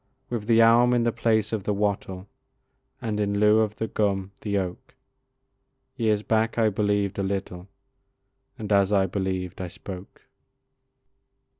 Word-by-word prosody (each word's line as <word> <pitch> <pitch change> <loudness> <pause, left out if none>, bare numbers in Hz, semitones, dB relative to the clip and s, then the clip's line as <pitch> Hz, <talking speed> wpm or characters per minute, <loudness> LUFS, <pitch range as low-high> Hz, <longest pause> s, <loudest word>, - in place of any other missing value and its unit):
With 110 -3 -3
the 115 -1 +5
elm 120 +2 +5
in 120 - +2
the 120 - +2
place 110 -1 0
of 110 - -1
the 105 +1 -1
wattle, 100 -2 -2 0.8
And 105 -2 -2
in 100 -1 0
lieu 105 +1 +5
of 110 -1 0
the 110 - -3
gum, 100 -3 -1
the 100 -2 -1
oak, 90 -2 -5 1.0
Years 105 -2 +1
back 110 +1 0
I 110 -2 +4
believed 100 -1 0
a - - +1
little, 95 -2 -4 0.9
And 105 -1 -6
as 100 -1 +3
I 100 -2 +3
believed 95 -1 -3
I 90 - -3
spoke. 90 +2 -10
105 Hz, 150 wpm, -25 LUFS, 95-110 Hz, 1.0 s, the